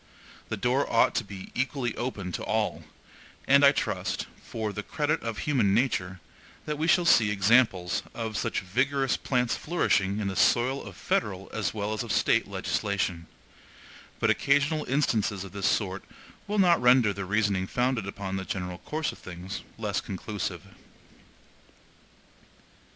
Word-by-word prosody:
The - - -2
door 130 +3 +1
ought 115 - +4
to - - 0
be 100 -2 -10
equally 130 -2 -1
open 105 -7 -4
to - - -4
all; - - -1 0.6
and 140 +1 +6
I 140 - +9
trust, - - -2 0.2
for 110 -2 -4
the 105 - -4
credit 150 +7 -1
of 115 -2 -4
human 115 -10 +2
nature, 95 -7 0 0.5
that 150 -1 -3
we 160 - 0
shall 175 +1 +4
see 110 -9 +5
examples 100 -3 +3
of 110 -2 -4
such - - -1
vigorous 130 +8 +1
plants 125 -2 0
flourishing 100 - +1
in 105 - -1
the 95 - -3
soil 130 +7 +2
of 95 -3 -10
federal - - -2
as - - -2
well 105 0 -2
as 110 - -2
of - - -4
State - - +2
legislation; 95 -5 -2 0.9
but - - +3
occasional 145 +2 +2
instances 110 -8 0
of 95 - -9
this 100 -1 -1
sort 95 -2 0 0.4
will 210 +1 -1
not 175 -6 +5
render 125 -4 +5
the 100 0 -5
reasoning 100 -1 +1
founded 125 -3 0
upon 95 -1 -4
the 95 - -3
general 90 -2 -4
course 155 0 -3
of - - -14
things, 90 +2 -7 0.2
less 105 -3 -2
conclusive. 95 -2 -5
110 Hz, 155 wpm, -27 LUFS, 95-135 Hz, 0.9 s, I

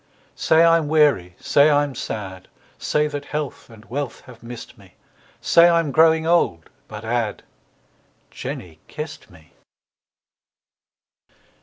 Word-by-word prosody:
Say 160 +1 +3
I'm 165 -2 +4
weary, 145 - +2
say 145 +2 +4
I'm 145 -1 +1
sad, 95 -6 -6 0.3
Say 150 0 0
that 145 -1 -5
health 150 -3 -5
and 110 -1 -16
wealth 135 +1 -5
have 120 -2 -15
missed 120 +1 -10
me, 100 -6 -20 0.5
Say 170 +1 +5
I'm 165 -3 +1
growing 160 +2 +4
old, 160 - +1 0.2
but 105 0 -9
add, 115 -2 -2 0.9
Jenny 80 -3 -8
kissed 150 0 -8
me. 80 -3 -20
140 Hz, 120 wpm, -21 LUFS, 105-155 Hz, 0.9 s, Say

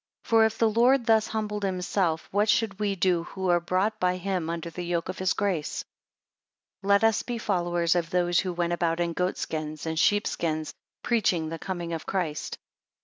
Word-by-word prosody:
For 225 -1 +4
if 220 - -1
the 230 - +3
Lord 240 +3 +3
thus 220 -1 +4
humbled 210 -1 -3
himself, 180 -3 -1
what 205 +2 +2
should 210 -1 +1
we 205 -2 0
do 175 -2 +1
who 190 0 -3
are 175 0 +4
brought 190 +5 0
by 180 0 +1
him 180 -3 -2
under 170 0 -4
the 180 - -6
yoke 175 0 -2
of 185 - -5
his 185 0 +2
grace? 180 -7 -2 1.0
17 195 - -5
Let 200 +1 +5
us 225 -1 +3
be 240 0 -4
followers 175 -5 +1
of 170 -2 -1
those 175 -2 +2
who 185 - -1
went 175 0 -1
about 170 -1 0
in 170 -1 0
goat 180 +2 -1
skins, 155 -1 -4
and 160 0 -1
sheep 205 +3 +3
skins; 155 -2 -2 0.3
preaching 185 -9 +1
the 165 0 -5
coming 175 -2 -4
of 165 - -5
Christ. 170 -6 -2
180 Hz, 200 wpm, -27 LUFS, 170-205 Hz, 1.0 s, Let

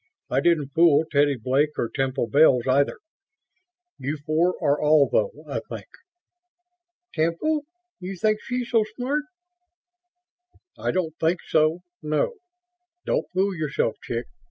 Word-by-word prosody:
I 130 - +3
didn't 155 -4 +2
fool 160 -2 +5
Teddy 145 -1 +3
Blake 135 +5 0
or 120 - 0
Temple 135 0 -1
Bells, 130 -1 +4
either. 135 +2 +2 1.0
You 145 +4 -3
four 170 +4 +2
are 145 +1 +1
all, 150 -2 +5
though, - - +1 0.2
I - - -2
think." - - -9 1.3
"Temple? 170 - 0 0.3
You 190 +1 -6
think 215 +3 +1
she's 250 -1 -4
so 225 -2 +4
smart?" 285 +4 -1 1.5
"I - - -3
don't 165 -4 -1
think 165 +2 +1
so, 155 +2 +2 0.2
no. 155 - -1 0.7
Don't - - 0
fool 190 +2 +1
yourself, 150 -8 -1
chick. 120 0 -4
155 Hz, 130 wpm, -24 LUFS, 140-185 Hz, 1.5 s, fool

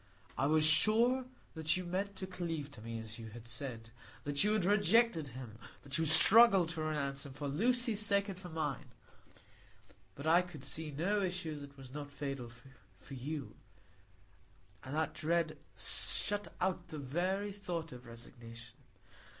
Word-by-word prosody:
I 135 - 0
was 155 0 +4
sure 225 +11 +4 0.3
that 160 +1 0
you 185 - -4
meant 195 +3 -3
to 190 - -6
cleave 165 -6 -5
to 120 - -12
me, 115 +1 -6
as 110 +1 -8
you 115 - -8
had 115 +1 -12
said; 115 -2 -5 0.3
that 145 -1 +1
you 210 +1 +2
had 215 -5 0
rejected 205 -3 +3
him; 120 -3 -10 0.2
that 140 +2 -1
you 160 - +2
struggled 195 +1 +9
to 165 -1 -4
renounce 140 -3 -3
him, 140 -3 -10
for 145 +1 -6
Lucy's 225 - +1
sake 200 -1 +1
and 190 -2 -7
for 180 -1 -10
mine. 155 -4 -4 1.3
But 140 - -9
I 165 +3 +5
could 180 -6 -11
see 150 +3 -2
no 180 +9 -1
issue 180 -4 -3
that 140 -1 -12
was 130 -1 -12
not 145 -1 -7
fatal 135 -4 -6 0.5
for 95 +9 -14
you; 140 +2 -6 1.3
and 130 +3 -7
that 155 -1 -1
dread 165 0 -1 0.2
shut 205 0 +2
out 185 0 -2
the 160 -2 -8
very 180 +9 -2
thought 175 -5 -6
of 125 -1 -12
resignation. 115 0 -11
155 Hz, 165 wpm, -33 LUFS, 135-185 Hz, 1.3 s, struggled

